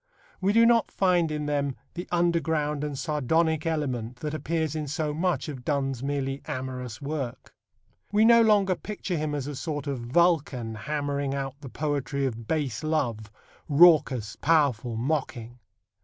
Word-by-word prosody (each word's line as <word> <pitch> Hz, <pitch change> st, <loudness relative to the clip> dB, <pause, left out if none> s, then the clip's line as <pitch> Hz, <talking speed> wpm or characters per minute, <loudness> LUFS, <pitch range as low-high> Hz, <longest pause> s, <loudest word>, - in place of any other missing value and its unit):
We 190 Hz, +2 st, +3 dB
do 230 Hz, +2 st, +5 dB
not 230 Hz, -1 st, +4 dB
find 180 Hz, -4 st, +2 dB
in 150 Hz, -1 st, -3 dB
them 140 Hz, -2 st, -1 dB, 0.2 s
the 175 Hz, -, -6 dB
underground 160 Hz, -4 st, +1 dB
and 145 Hz, -2 st, -3 dB
sardonic 160 Hz, +2 st, +1 dB
element 130 Hz, -7 st, -2 dB
that 150 Hz, +4 st, -5 dB
appears 160 Hz, 0 st, -2 dB
in 155 Hz, -1 st, -3 dB
so 155 Hz, +1 st, -2 dB
much 175 Hz, +3 st, 0 dB
of 135 Hz, -5 st, -7 dB
Donne's 135 Hz, -3 st, -1 dB
merely 135 Hz, 0 st, -2 dB
amorous 130 Hz, -3 st, -5 dB
work. 140 Hz, -4 st, -5 dB, 0.6 s
We 210 Hz, +2 st, +4 dB
no 235 Hz, 0 st, +7 dB
longer 205 Hz, -4 st, +4 dB
picture 200 Hz, -1 st, -5 dB
him 150 Hz, -2 st, -2 dB
as 140 Hz, -3 st, -3 dB
a 145 Hz, 0 st, -5 dB
sort 150 Hz, +1 st, -4 dB
of 140 Hz, -3 st, -3 dB
Vulcan 130 Hz, -3 st, +1 dB
hammering 140 Hz, +3 st, -2 dB
out 135 Hz, 0 st, -5 dB
the 135 Hz, -, -8 dB
poetry 140 Hz, -1 st, -2 dB
of 115 Hz, -3 st, -4 dB
base 145 Hz, -8 st, -1 dB
love, 125 Hz, -9 st, -1 dB, 0.4 s
raucous, 145 Hz, -8 st, +5 dB
powerful, 135 Hz, -8 st, +2 dB
mocking. 125 Hz, -3 st, -3 dB
145 Hz, 155 wpm, -27 LUFS, 130-160 Hz, 0.6 s, no